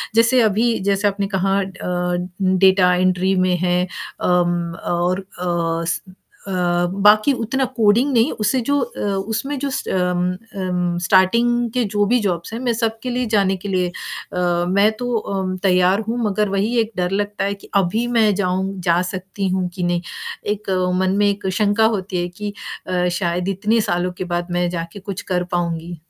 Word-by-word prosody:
जैसे 230 +2 +5
अभी 225 +2 +2
जैसे 200 +1 +2
आपने 200 0 -1
कहा 195 +1 +2
अ, 180 -2 -2 0.3
डाटा 185 -1 +4
एंट्री 185 +1 +2
में 180 - +2
है 180 0 +1 0.4
अम, 175 -1 +1
और 180 +2 0
अ, 170 -2 -1
स 165 - -1 0.5
अ, - - -4 0.5
बाकी 215 +6 +6
उतना 265 +4 0
कोडिंग 230 +6 +4
नहीं, 230 0 +3
उसे 215 +5 +2
जो 285 0 +2
अ, 240 - -5 0.3
उसमें 270 +6 -2
जो 280 - -2
स - - -2
उम 180 -1 0 0.3
उम, 180 -1 -1
स्टार्टिंग 190 +6 +4 0.2
की 250 +1 +1
जो 205 0 +3
भी 245 +3 +3
जॉब्स 180 -1 -2
हैं 230 - -3
मैं 245 -2 0
सबके 225 +1 -2
लिए 250 0 -1
जाने 195 -2 +3
के 205 - -4
लिए 185 -2 +1
अ, 175 0 -3
मैं 200 +3 +4
तो 245 - -3
उम, 190 -3 -3
तैयार 185 +1 +3
हूँ 235 +2 -1
मगर 210 0 0
वही 205 +5 0
एक 225 0 0
डर 180 0 0
लगता 205 +1 -1
है 200 - 0
कि 200 - -14
अभी 200 +5 +2
मैं 215 -2 +4
जाऊँ 190 0 -1
जा 170 0 +2
सकती 190 +1 -4
हूँ 185 0 0
कि 180 - -3
नहीं, 175 0 0 0.4
एक 210 -1 -3 0.3
मन 190 +1 +1
में 205 0 +4
एक 200 -1 -3
शंका 210 +1 +3
होती 195 -4 -1
है 175 - -2
कि 210 -1 -4 0.3
अ, 180 -1 +1
शायद 175 +1 -1
इतने 210 +4 +1
सालों 180 -2 -1
के - - -3
बाद 175 +1 -2
मैं 175 0 +1
जाके 170 +2 -5
कुछ 195 -1 -6
कर 180 - +1
पाऊँगी? 170 0 -2
190 Hz, 180 wpm, -20 LUFS, 180-210 Hz, 0.5 s, बाकी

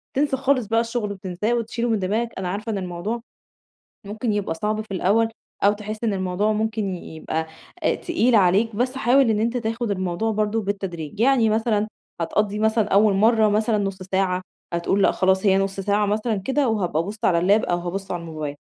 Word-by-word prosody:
تنسى 275 -1 +1
خالص 265 -2 +1
بقى 225 +1 +2
الشغل، 230 -4 -3
تنساه 190 +5 -2
وتشيله 235 +1 -2
من 220 -3 +1
دماغك. 215 +5 -1
أنا 190 -1 -3
عارفة 210 +4 -3
إن 210 - -2
الموضوع 185 +5 -4 0.9
ممكن 215 +2 -2
يبقى 205 -5 -1
صعب 215 +4 -1
في 215 -2 -6
الأوَّل، 210 +5 +2 0.4
أو 205 - +6
تحس 215 +2 -6
إن 215 - +1
الموضوع 190 +3 0
ممكن 215 -2 -1
ي 165 -2 -9
يبقى 160 0 -3 0.4
آآ، - - +2
تقيل 255 -9 +1
عليك، 205 +2 +3
بس 255 +3 0
حاول 265 -1 +4
إن 210 - +1
أنتَ 235 +3 0
تاخُد 230 0 -2
الموضوع 185 +3 -1
برضه 215 +1 0
بالتدريج. 195 -3 -4
يعني 245 -2 +4
مثلًا 215 -1 +1 0.3
هتقضِّي 205 +5 0
مثلًا 220 0 +2
أوَّل 205 0 +4
مرَّة 220 +2 +4
مثلًا 215 +1 +1
نُص 195 -1 -2
ساعة، 185 -1 0 0.3
هتقول 170 +3 +1
لأ - - +4
خلاص 190 +2 +2
هي 190 -1 +5
نُص 195 0 -1
ساعة 205 +1 +1
مثلًا 215 +2 0
كده 265 +7 0
وهابقى 180 -7 0
أبُصّ 205 +5 -6
على 170 - +4
اللاب، 200 +5 +3
أو 175 - 0
هابُصّ 185 +3 -5
على 175 - -3
الموبايل. 155 -3 -5
210 Hz, 195 wpm, -23 LUFS, 190-225 Hz, 0.9 s, أو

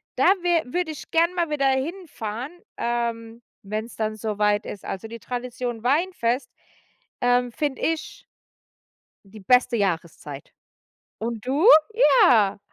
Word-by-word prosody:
da - - +2 0.2
wä 345 -2 +2
würde 340 +5 -2
ich 305 - -10
gern 335 +2 +3
mal 340 -3 0
wieder 275 -2 +1
hinfahren, 265 - -3 0.3
ähm 235 -1 -3 0.2
wenn's 215 +3 -5
dann 215 -1 -2
so 215 -1 -4
weit 210 0 +2
ist. 200 - -8
Also 195 +3 -5
die 230 +1 -9
Tradition 245 -1 -5
Weinfest, 260 -4 0 0.7
ähm, 245 0 +2
finde 290 -1 -2
ich 325 -1 -2 1.0
die 205 +2 -13
beste 250 +1 +4
Jahreszeit. 165 -7 -3 0.7
Und 225 -1 -4
du? 285 +9 +2 0.6
Ja. 215 - +4
240 Hz, 125 wpm, -24 LUFS, 220-285 Hz, 1.0 s, beste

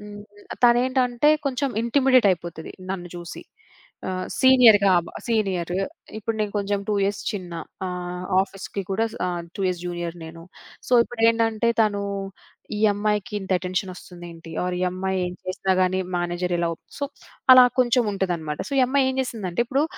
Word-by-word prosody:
హ్మ్. 205 0 -9 0.4
తనేంటంటే, 250 +2 +3 0.2
కొంచేం 270 0 -1
ఇంటిమిడేటయిపోతది. 230 - +2 0.2
నన్ను 180 -2 -4
చూసి. 175 -1 -8 0.7
ఆహ్, 185 0 -3
సీనియర్‌గా 235 -7 +7
అవ 170 - -4 0.2
సీనియరు. 185 -6 0 0.4
ఇప్పుడు 220 +1 -3
నేను 210 -1 -1
కొంచేం 200 0 -1
2 210 - +1
ఇయర్స్ 200 +1 -1
చిన్న. 185 -4 -6 0.3
ఆహ్, 180 0 -5 0.2
ఆఫీస్‌కి 195 0 -6
కూడా 210 +4 +1 0.2
ఆహ్, 175 -1 -3
2 - - -6
ఇయర్స్ 180 -2 -1
జూనియర్ 175 -1 -4
నేను. 165 +1 -10 0.5
సో, - - -3
ఇప్పుడేందంటే, 230 -1 +1
తనూ 205 -2 +2 0.8
ఈ - - -4
అమ్మాయికి 210 +2 -1
ఇంత 190 - -9
అటెన్షనొస్తుందేంటి 180 -2 -6
ఆర్ 180 0 -2
ఈ - - 0
అమ్మాయి 190 +1 -2
ఏం 180 - -5
చేసినా 190 +1 -1
గానీ 185 0 +2 0.2
మేనేజర్ 175 +1 -1
ఇలా 170 -1 +1
ఒప్ - - -28 0.2
సో, 285 - -1 0.5
అలా 255 -1 +10 0.2
కొంచేం 240 -1 +3
ఉంటదనమాట. 170 -6 -2
సో, - - -7
ఈ - - +5
అమ్మాయి 270 0 +2
ఏం 260 - -5
చేసిందంటే, 220 -5 -2
ఇప్పుడు 275 +5 +1
195 Hz, 150 wpm, -24 LUFS, 180-230 Hz, 0.8 s, అలా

